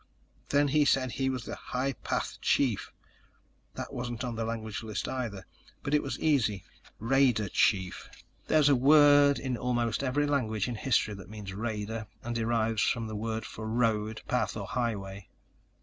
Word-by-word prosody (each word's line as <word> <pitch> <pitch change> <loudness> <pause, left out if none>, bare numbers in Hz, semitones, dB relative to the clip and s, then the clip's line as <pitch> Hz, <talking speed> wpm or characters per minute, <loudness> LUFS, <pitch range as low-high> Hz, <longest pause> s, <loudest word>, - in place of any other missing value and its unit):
"Then 145 0 +3
he 150 +2 +4
said 130 -3 +2
he 135 +1 -1
was 130 -3 -3
High 130 +2 -3
Path - - -3
Chief. 125 -8 +1 0.8
That - - -6
wasn't 120 -1 -4
on 125 -2 -3
the 115 0 -3
language 110 -2 -4
list, 110 -2 -4
either. 110 -7 -4 0.4
But 145 - -2
it 150 - +4
was 135 -3 -4
easy: 115 - +1 0.3
Raider 120 -2 +2
Chief. 95 -2 +1 0.4
There's 155 -2 +4
a 145 - +6
word 145 +1 +6
in 130 -3 -3
almost 120 -2 0
every 140 +3 +1
language 115 -8 0
in 120 - -3
history 115 -2 +1
that 100 -1 -10
means 105 -2 -7
raider 110 0 -4 0.2
and 120 - -3
derives 115 -2 0
from 115 -2 +1
a - - -5
word 110 +1 -3
for 110 - -7
road, 110 -2 0
path 125 -3 0
or 100 - -4
highway." 100 -5 -3
115 Hz, 165 wpm, -29 LUFS, 110-135 Hz, 0.8 s, a